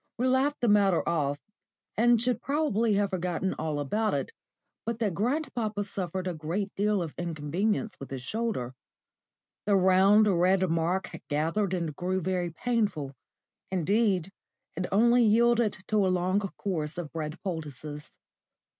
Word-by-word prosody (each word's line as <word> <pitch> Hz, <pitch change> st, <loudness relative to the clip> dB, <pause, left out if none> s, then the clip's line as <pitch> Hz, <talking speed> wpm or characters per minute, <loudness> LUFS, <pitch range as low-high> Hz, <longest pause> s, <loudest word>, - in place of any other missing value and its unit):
*_ -, -, -52 dB
We 250 Hz, +3 st, +1 dB
laughed 270 Hz, +3 st, +1 dB
the 240 Hz, -, +2 dB
matter 200 Hz, -4 st, +3 dB
off, 145 Hz, -4 st, 0 dB, 0.6 s
and 235 Hz, +1 st, +4 dB
should 245 Hz, 0 st, 0 dB
probably 235 Hz, -8 st, +1 dB
have 200 Hz, 0 st, +1 dB
forgotten 180 Hz, 0 st, -1 dB
all 155 Hz, -2 st, -2 dB
about 210 Hz, +10 st, 0 dB
it -, -, -3 dB, 0.5 s
but 230 Hz, -1 st, -3 dB
that 215 Hz, -5 st, 0 dB
grandpapa 220 Hz, -, -1 dB
suffered 185 Hz, -2 st, -4 dB
a 180 Hz, -, -2 dB
great 170 Hz, +6 st, -3 dB
deal 205 Hz, -2 st, +1 dB
of 160 Hz, -, -6 dB
inconvenience 175 Hz, +6 st, -1 dB
with 135 Hz, -, -8 dB
his 130 Hz, -2 st, -6 dB
shoulder. 215 Hz, -, -2 dB, 0.9 s
The 205 Hz, -, +4 dB
round, 190 Hz, +3 st, +5 dB
red 185 Hz, 0 st, +3 dB
mark 170 Hz, +3 st, 0 dB, 0.2 s
gathered 165 Hz, +6 st, 0 dB
and 165 Hz, -4 st, -3 dB
grew 185 Hz, +3 st, -1 dB
very 180 Hz, 0 st, -1 dB
painful. 200 Hz, -, -1 dB, 0.6 s
Indeed 190 Hz, 0 st, +1 dB, 0.4 s
it 180 Hz, +2 st, -2 dB
only 235 Hz, +5 st, +5 dB
yielded 230 Hz, 0 st, +3 dB
to 215 Hz, -, +2 dB
a -, -, +2 dB
long 185 Hz, +2 st, +1 dB
course 180 Hz, -6 st, -3 dB
of 170 Hz, -4 st, -6 dB
bread 155 Hz, 0 st, -4 dB
poultices. 150 Hz, -4 st, -6 dB
190 Hz, 145 wpm, -28 LUFS, 165-215 Hz, 0.9 s, round